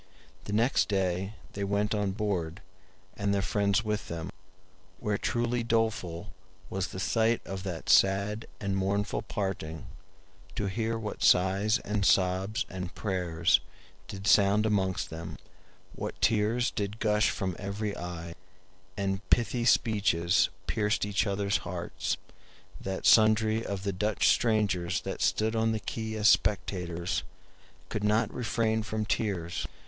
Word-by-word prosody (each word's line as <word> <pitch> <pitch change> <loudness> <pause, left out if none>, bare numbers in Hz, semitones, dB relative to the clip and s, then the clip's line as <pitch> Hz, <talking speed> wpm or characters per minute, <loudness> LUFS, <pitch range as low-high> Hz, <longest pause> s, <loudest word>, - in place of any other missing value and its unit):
The 105 - -4
next 115 +5 +3
day 95 +1 -1 0.2
they 100 - -3
went 100 +2 0
on 100 -2 0
board, 95 -3 -2 0.5
and 100 -1 -1
their 100 - 0
friends 100 +1 +1
with 105 0 -2
them, 85 0 -5 0.7
where 105 -1 -1
truly 120 0 0
doleful 110 -6 -1 0.4
was 95 0 -1
the 95 - -7
sight 115 +4 +2
of 95 -1 -5
that 85 -4 -5
sad 100 +3 +3
and 100 -1 -1
mournful 100 +2 0
parting, 85 -6 -4 0.7
to 105 - -1
hear 115 +3 -1
what 110 -2 -6
sighs 95 +5 +4
and 105 0 -1
sobs 95 +6 +2
and 90 -1 -6
prayers 90 -5 +1 0.5
did 95 0 -7
sound 100 +1 +5
amongst 95 -4 0
them; 80 +1 -7 0.6
what - - -6
tears 115 +3 +2
did 100 +1 -3
gush 105 -1 +2
from 95 -2 -2
every 100 +1 -3
eye, 85 -1 -6 0.6
and 95 -1 -1
pithy 120 0 +2
speeches 100 -7 +3 0.2
pierced 105 -2 0
each 105 +1 0
other's 100 -1 +1
heart, 90 -2 -3 0.6
that 95 0 -4
sundry 110 0 +5
of 100 -3 -4
the 100 -1 -1
Dutch 105 +3 +2
strangers 100 -6 +1
that 95 - -5
stood 110 +5 +1
on 110 0 +2
the 110 - -1
Key 110 0 -4
as 110 0 +2
spectators 90 -5 +1 0.7
could 105 - -3
not 105 +1 +2
refrain 110 -1 0
from 110 0 -3
tears. 95 -6 -2
100 Hz, 135 wpm, -29 LUFS, 95-110 Hz, 0.7 s, sound